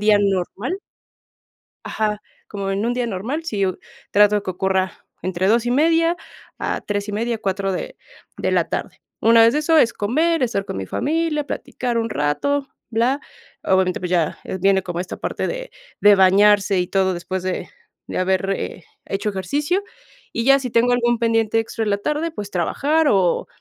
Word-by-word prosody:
día 210 Hz, 0 st, +5 dB
normal. 200 Hz, -, -1 dB, 1.1 s
Ajá, 210 Hz, -1 st, -1 dB, 0.3 s
como 195 Hz, -1 st, -4 dB
en 200 Hz, +3 st, -1 dB
un 240 Hz, -, +1 dB
día 245 Hz, -1 st, -1 dB
normal, 235 Hz, -, -3 dB
sí 205 Hz, -10 st, -1 dB
u 185 Hz, -, -2 dB, 0.3 s
trato 210 Hz, 0 st, +5 dB
de 205 Hz, -, 0 dB
que 185 Hz, -, -2 dB
ocurra 190 Hz, +1 st, 0 dB, 0.3 s
entre 185 Hz, +1 st, -1 dB
2:30 310 Hz, +9 st, +3 dB, 0.4 s
a -, -, -2 dB
3:30 210 Hz, +3 st, -2 dB
4 195 Hz, -2 st, -1 dB
de -, -, -5 dB, 0.4 s
de -, -, -1 dB
la -, -, +1 dB
tarde. -, -, -4 dB, 0.2 s
Una 230 Hz, 0 st, +6 dB
vez 230 Hz, +1 st, +6 dB
de 300 Hz, -, +2 dB
eso 320 Hz, +1 st, +3 dB
es 235 Hz, -, +4 dB
comer, 305 Hz, +8 st, +1 dB
estar 200 Hz, -5 st, -1 dB
con -, -, -5 dB
mi 95 Hz, -, -4 dB
familia, 305 Hz, -, -1 dB
platicar 245 Hz, -4 st, -3 dB
un 230 Hz, 0 st, -1 dB
rato, 270 Hz, -, 0 dB, 0.2 s
bla. 240 Hz, +5 st, +1 dB, 0.4 s
Obviamente, 190 Hz, -1 st, +2 dB
pues, 180 Hz, -, -3 dB
ya, 170 Hz, -4 st, +1 dB
eh, -, -, -4 dB
viene 195 Hz, 0 st, +3 dB
como 175 Hz, -1 st, -4 dB
esta 185 Hz, -, -7 dB
parte -, -, -3 dB
de -, -, -5 dB, 0.3 s
de 205 Hz, 0 st, +7 dB
bañarse 195 Hz, 0 st, +5 dB
y 180 Hz, -, 0 dB
todo 190 Hz, -1 st, +1 dB
después 180 Hz, +1 st, -4 dB
de 185 Hz, -, -3 dB, 0.4 s
de -, -, -4 dB
haber, 190 Hz, +1 st, +1 dB
eh, 185 Hz, -3 st, -4 dB, 0.2 s
hecho 200 Hz, +2 st, -2 dB
ejercicio. 290 Hz, -, -1 dB, 0.5 s
y 230 Hz, -, -1 dB
ya, 275 Hz, +1 st, +7 dB
si 255 Hz, -, -4 dB
tengo 245 Hz, +1 st, +3 dB
algún 240 Hz, -1 st, +1 dB
pendiente 225 Hz, -1 st, +2 dB
extra 225 Hz, 0 st, -3 dB
en 210 Hz, -, -1 dB
la 200 Hz, -, +2 dB
tarde, 300 Hz, +8 st, -1 dB
pues, 205 Hz, -9 st, -6 dB
trabajar 290 Hz, -, +1 dB
o 185 Hz, -4 st, +2 dB
210 Hz, 180 wpm, -21 LUFS, 190-250 Hz, 1.1 s, de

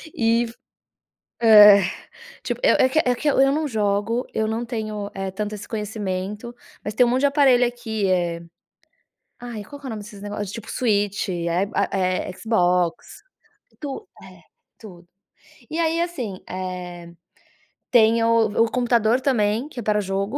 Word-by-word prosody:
e 230 Hz, +1 st, +2 dB, 1.0 s
é, 210 Hz, -3 st, +8 dB, 0.6 s
tipo -, -, -3 dB
eu -, -, +5 dB
é 260 Hz, -, +4 dB
que 310 Hz, -, +2 dB
eu -, -, +5 dB
é 250 Hz, 0 st, +2 dB
que 300 Hz, -, -4 dB
eu 280 Hz, -, +1 dB
eu 270 Hz, 0 st, +4 dB
não 310 Hz, +1 st, -1 dB
jogo, 215 Hz, +1 st, -1 dB
eu 220 Hz, -, 0 dB
não 225 Hz, +2 st, -2 dB
tenho, 215 Hz, -3 st, -4 dB
eh, 195 Hz, -1 st, -4 dB
tanto 210 Hz, +2 st, -4 dB
esse 205 Hz, -, -9 dB
conhecimento, 210 Hz, +1 st, -4 dB, 0.3 s
mas 210 Hz, -, -4 dB
tem 245 Hz, +4 st, +4 dB
um -, -, +1 dB
monte 255 Hz, +2 st, +1 dB
de 285 Hz, -, +4 dB
aparelho 275 Hz, -4 st, +4 dB
aqui, 230 Hz, -4 st, -3 dB
eh, 175 Hz, -2 st, 0 dB, 1.0 s
ai 240 Hz, -4 st, -7 dB
qual 285 Hz, +7 st, -11 dB
que -, -, -13 dB
é -, -, -5 dB
nome 220 Hz, -3 st, -5 dB
desses 205 Hz, -1 st, -12 dB
negócios? 205 Hz, -1 st, -5 dB
Tipo 225 Hz, 0 st, -8 dB
Switch, 205 Hz, -4 st, 0 dB
eh, 170 Hz, -2 st, -3 dB, 0.3 s
a -, -, 0 dB
eh, 185 Hz, 0 st, -1 dB
Xbox, 180 Hz, -5 st, 0 dB, 0.6 s
tu 290 Hz, +8 st, -6 dB, 0.2 s
eh, -, -, -15 dB, 0.4 s
tudo. 175 Hz, -5 st, -13 dB, 0.6 s
E 315 Hz, -, -3 dB
aí, 330 Hz, 0 st, +1 dB
assim, 255 Hz, -, -4 dB
eh, 180 Hz, -2 st, -6 dB, 0.8 s
tem 230 Hz, 0 st, +4 dB
o 230 Hz, -1 st, +3 dB
o 225 Hz, -, -6 dB
computador 240 Hz, -1 st, +2 dB
também 230 Hz, -1 st, +1 dB
que 260 Hz, -, -9 dB
é -, -, -5 dB
para 210 Hz, 0 st, +1 dB
jogo 195 Hz, +5 st, -2 dB
220 Hz, 170 wpm, -22 LUFS, 200-245 Hz, 1.0 s, é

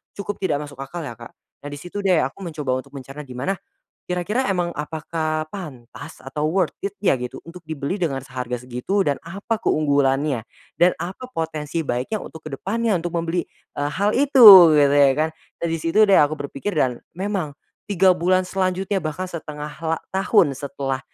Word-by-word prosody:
cukup 200 Hz, 0 st, -5 dB
tidak 150 Hz, -6 st, 0 dB
masuk 145 Hz, -2 st, -11 dB
akal 135 Hz, +6 st, -6 dB
ya 120 Hz, -6 st, -7 dB
Kak. 115 Hz, -, -11 dB, 0.3 s
Nah 145 Hz, -, -6 dB
di -, -, -5 dB
situ 175 Hz, +6 st, -8 dB
deh 185 Hz, -4 st, +4 dB
aku 135 Hz, +6 st, -4 dB
mencoba 150 Hz, -6 st, -2 dB
untuk 130 Hz, -, -9 dB
mencerna 135 Hz, +2 st, -8 dB
gimana, 130 Hz, +9 st, -3 dB, 0.5 s
kira-kira 200 Hz, +9 st, -1 dB
emang 180 Hz, -3 st, 0 dB
apakah 155 Hz, 0 st, -3 dB
pantas 150 Hz, -, -9 dB
atau 150 Hz, -1 st, -2 dB
worth 180 Hz, 0 st, +1 dB
it 200 Hz, 0 st, -4 dB
ya 160 Hz, -, +4 dB
gitu 125 Hz, +1 st, -6 dB
untuk 170 Hz, +2 st, -11 dB
dibeli 155 Hz, +5 st, -3 dB
dengan 135 Hz, -6 st, -1 dB
seharga 125 Hz, -2 st, -4 dB
segitu 125 Hz, +11 st, -1 dB
dan 145 Hz, -2 st, 0 dB
apa 200 Hz, +6 st, -4 dB
keunggulannya, 140 Hz, -, +1 dB, 0.4 s
dan 175 Hz, +1 st, +5 dB
apa 185 Hz, +9 st, -6 dB
potensi 160 Hz, -, -3 dB
baiknya 125 Hz, -, -2 dB
untuk 160 Hz, -1 st, -9 dB
ke 140 Hz, -, -5 dB
depannya 220 Hz, +7 st, 0 dB
untuk 175 Hz, 0 st, -4 dB
membeli, 170 Hz, +1 st, -1 dB, 0.3 s
eee, 145 Hz, 0 st, -1 dB
hal 200 Hz, +3 st, +1 dB
itu 225 Hz, -, +10 dB
gitu 145 Hz, -2 st, +5 dB
ya 140 Hz, -1 st, +6 dB
kan 160 Hz, +1 st, +1 dB, 0.3 s
dan 170 Hz, -, -2 dB
di 165 Hz, -, -1 dB
situ 210 Hz, +6 st, +4 dB
deh 195 Hz, -, +6 dB
aku 150 Hz, +1 st, +3 dB
berpikir 140 Hz, +8 st, -4 dB
dan 125 Hz, -4 st, +2 dB, 0.2 s
memang, 190 Hz, -6 st, -2 dB, 0.4 s
3 190 Hz, -1 st, +5 dB
bulan 185 Hz, +1 st, +2 dB
selanjutnya 190 Hz, +1 st, -1 dB
bahkan 155 Hz, +4 st, -3 dB
1/2 150 Hz, -3 st, -7 dB
la 160 Hz, 0 st, 0 dB, 0.2 s
tahun 190 Hz, -5 st, +3 dB
setelah, 135 Hz, -1 st, -3 dB
160 Hz, 180 wpm, -22 LUFS, 140-185 Hz, 0.5 s, itu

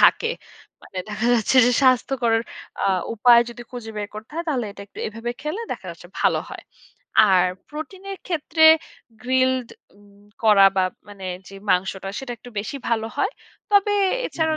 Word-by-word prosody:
থাকে। 465 Hz, 0 st, +4 dB, 0.5 s
মানে 190 Hz, -, -9 dB
দেখা 215 Hz, +2 st, -2 dB
যাচ্ছে, 235 Hz, +3 st, +1 dB
যে 250 Hz, -, +3 dB
স্বাস্থ্যকর 255 Hz, -2 st, +3 dB, 0.5 s
আ -, -, +3 dB, 0.3 s
উপায় 235 Hz, +2 st, +6 dB
যদি 240 Hz, 0 st, -9 dB
খুঁজে 240 Hz, -3 st, -7 dB
বের 205 Hz, 0 st, -3 dB
করতে 215 Hz, +4 st, -9 dB
হয় 335 Hz, -, -3 dB
তাহলে 255 Hz, -7 st, 0 dB
এটা 200 Hz, -, -10 dB
একটু -, -, -15 dB
এভাবে 230 Hz, +2 st, -5 dB
খেলে 310 Hz, +8 st, -3 dB
দেখা -, -, -9 dB
যাচ্ছে -, -, -12 dB
ভালো -, -, +3 dB
হয়। -, -, -9 dB, 0.7 s
আর 180 Hz, -1 st, +5 dB, 0.3 s
প্রোটিনের 380 Hz, +6 st, -7 dB
ক্ষেত্রে 320 Hz, -2 st, +1 dB, 0.6 s
গ্রিলড 255 Hz, -1 st, +1 dB, 0.3 s
উম 205 Hz, 0 st, -21 dB, 0.2 s
করা 205 Hz, -3 st, +7 dB
বা 185 Hz, -, +4 dB, 0.2 s
মানে 195 Hz, -2 st, -9 dB, 0.2 s
যে 195 Hz, -, -12 dB, 0.2 s
মাংসটা 190 Hz, +1 st, 0 dB
সেটা 265 Hz, -2 st, -5 dB
একটু 245 Hz, -, -13 dB
বেশি 220 Hz, +7 st, -6 dB
ভালো 225 Hz, -1 st, 0 dB
হয়। 400 Hz, +4 st, 0 dB, 0.4 s
তবে 410 Hz, 0 st, +4 dB, 0.3 s
এছাড়াও 315 Hz, -1 st, -1 dB
240 Hz, 160 wpm, -23 LUFS, 210-300 Hz, 0.7 s, করা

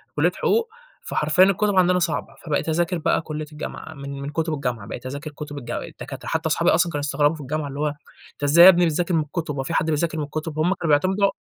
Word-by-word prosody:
كُلِّيَّة -, -, +3 dB
حُقوق، 460 Hz, 0 st, +1 dB, 0.3 s
فحرفيًا 155 Hz, +5 st, +2 dB
الكُتب 195 Hz, +1 st, +2 dB
عندنا 180 Hz, 0 st, +4 dB
صعبة، 170 Hz, -2 st, -2 dB
فبقيت 155 Hz, +1 st, -1 dB
اذاكر 175 Hz, +2 st, 0 dB
بقى 165 Hz, -, +1 dB
كُلِّية 155 Hz, -1 st, -5 dB
الجامعة، 155 Hz, +1 st, -7 dB
من 140 Hz, -1 st, -7 dB
من 140 Hz, -, -4 dB
كُتب 160 Hz, +1 st, -1 dB
الجامعة، 125 Hz, -7 st, -3 dB
بقيت 120 Hz, -, -7 dB
اذاكر 145 Hz, +3 st, -6 dB
كُتب 145 Hz, 0 st, -8 dB
الجا 120 Hz, -3 st, -4 dB
الدكاترة، -, -, -9 dB
حتى -, -, -1 dB
أصحابي -, -, +2 dB
أصلًا 170 Hz, +1 st, +2 dB
كانوا 145 Hz, -, -2 dB
يستغربوا 145 Hz, +2 st, +1 dB
في 150 Hz, -, -9 dB
الجامعة 145 Hz, +2 st, -3 dB
اللي 140 Hz, +1 st, -7 dB
هو 150 Hz, -, +1 dB, 0.5 s
أنت -, -, -12 dB
إزاي 165 Hz, +5 st, +7 dB
يا -, -, +12 dB
ابني 175 Hz, -1 st, +5 dB
بتذاكر 170 Hz, +2 st, 0 dB
من 160 Hz, -, +3 dB
الكُتُب، 150 Hz, -1 st, -4 dB
هو 135 Hz, -, -2 dB
في 165 Hz, -, -4 dB
حد 160 Hz, -, +2 dB
بيذاكر 160 Hz, +1 st, 0 dB
من 150 Hz, -, -1 dB
الكُتُب، 155 Hz, +1 st, -5 dB
هُم 175 Hz, +5 st, +3 dB
كانوا 175 Hz, -3 st, -4 dB
بيعتمدوا 190 Hz, +5 st, +2 dB
155 Hz, 235 wpm, -23 LUFS, 145-170 Hz, 0.5 s, يا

